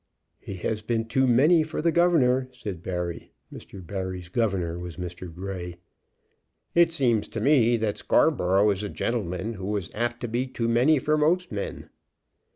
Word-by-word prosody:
"He 100 - -7
has 105 +4 -3
been 115 +1 -1
too 130 +4 +1
many 150 +8 +5
for 155 0 -4
the 165 +2 +2
governor," 135 -7 +3
said 100 -8 -7
Barry. 90 -2 -5 0.2
Mr. 95 -3 -10
Barry's 95 -2 -5
governor 90 -6 -1
was 90 -2 -7
Mr. 90 0 -7
Grey. 90 0 -6 1.0
"It 170 -1 +5
seems 120 -9 +1
to 110 - -5
me 120 -2 +4
that 110 -2 -2
Scarborough 105 - +3
is 100 0 -2
a 105 - -4
gentleman 105 -2 -2
who 100 0 -3
is 90 -4 -6
apt 120 +2 -2
to 120 - -2
be 120 +3 -1
too 125 -3 -3
many 125 +7 +4
for 155 +3 +1
most 175 +3 +1
men." 100 -2 -5
110 Hz, 165 wpm, -26 LUFS, 95-130 Hz, 1.0 s, many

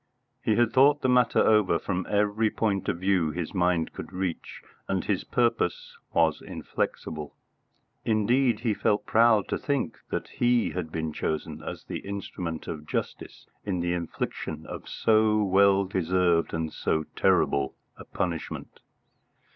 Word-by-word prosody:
He 110 - +1
had 120 0 +2
thought 140 +3 +5
the - - +3
matter 125 -2 +3
over 105 -6 +4
from 90 +2 -3
every 105 +1 +2
point 100 -3 -1
of - - -1
view 95 -3 +1
his 80 +1 -4
mind 90 -3 +1
could - - -8
reach, 90 -2 -4 0.2
and - - -1
his - - 0
purpose 115 -7 0 0.2
was 80 -2 +2
inflexible. 75 -2 -4 0.7
Indeed, 115 +2 +2
he 115 -3 +1
felt 105 +1 0
proud 110 -3 +4
to - - -1
think 140 -5 -2
that - - -3
he 120 -1 +2
had 90 -3 -4
been 80 -1 -3
chosen 80 0 -3
as - - -7
the - - -5
instrument 90 -4 -5
of 75 -1 -6
justice - - -4 0.2
in 95 -3 -2
the 85 0 0
infliction 85 -2 -4
of - - -8
so 110 -1 +3
well 100 0 +4
deserved 90 -2 +1
and 80 -1 -3
so 80 - 0
terrible 70 -1 +2 0.2
a - - -11
punishment. 85 -3 -4
95 Hz, 145 wpm, -27 LUFS, 85-110 Hz, 0.7 s, thought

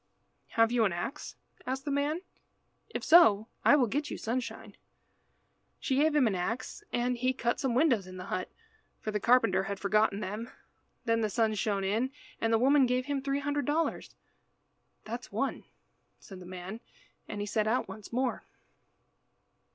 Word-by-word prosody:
"Have 225 0 +5
you 240 -2 +3
an 200 - +2
axe?" 210 +12 -5 0.3
asked 265 +1 -3
the 290 - -2
man. 290 +4 0 0.7
"If - - -5
so 220 -11 +6
I - - +7
will 270 -4 +4
get 290 +7 -2
you - - -4
sunshine." 225 -3 -4 1.0
She 265 - 0
gave 305 +1 +3
him 290 -4 +5
an 215 - +2
axe 190 +7 -3
and 245 +1 0
he 255 +2 +1
cut 235 -2 -1
some 260 -4 0
windows 245 - +3
in 185 0 -9
the 180 - -7
hut, 185 0 -3 0.5
for 215 - -4
the 210 - -1
carpenter 195 -5 +3
had 200 0 -4
forgotten 210 0 +2
them. 215 +4 -5 0.6
Then 230 -1 +2
the 215 - +1
sun 220 +1 +1
shone 200 -2 -1
in, 220 +7 0 0.3
and 225 - +1
the 225 - +5
woman 270 +2 +5
gave 250 +1 0
him 285 -1 -1
three 275 +1 -1
hundred 290 0 -1
dollars. 320 +3 -1 0.9
"That's - - -6
one," - - -2 0.5
said 190 -2 -12
the 180 - -11
man, 185 +4 -7 0.5
and 210 - -5
he 205 - -2
set 210 +1 0
out 240 +4 +1
once 215 -2 -10
more. 250 -1 -1
230 Hz, 175 wpm, -30 LUFS, 205-265 Hz, 1.0 s, I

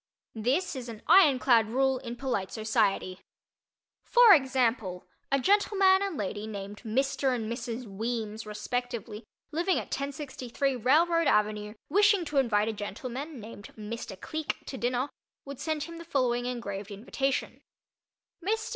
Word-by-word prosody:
This 260 - 0
is 250 -2 -6
an 220 -2 -9
iron 320 -5 +7
clad 235 -4 +4
rule 265 +2 +2
in 240 -2 -6
polite 240 -7 -2
society. 215 -4 0 0.8
For 480 -4 +7
example, 245 - +1 0.3
a 275 - +3
gentleman 390 +2 +4
and 395 -6 -2
lady 205 0 -3
named 205 -1 -6
Mr. 260 +3 0
and 225 -3 -3
Mrs. 235 +1 -4
Weems, 220 +1 -4
respectively, 230 0 -4 0.3
living 345 +4 +1
at - - -4
1063 275 -1 -2
Railroad 325 +7 +3
Ave., 210 -2 +1
wishing 405 +1 +4
to 295 -2 -3
invite 215 -5 +2
a 225 - -1
gentleman 250 +8 -6
named 210 -1 -10
Mr. 215 -2 -6
Cleek 315 -1 -3
to - - -6
dinner, 250 +1 0 0.4
would 280 -2 -8
send 310 -2 -2
him 335 +2 -8
the - - -8
following 245 -6 0
engraved 205 -5 -4
invitation: 255 +6 -2 0.8
MR. 440 +4 -1
250 Hz, 140 wpm, -29 LUFS, 215-285 Hz, 0.8 s, iron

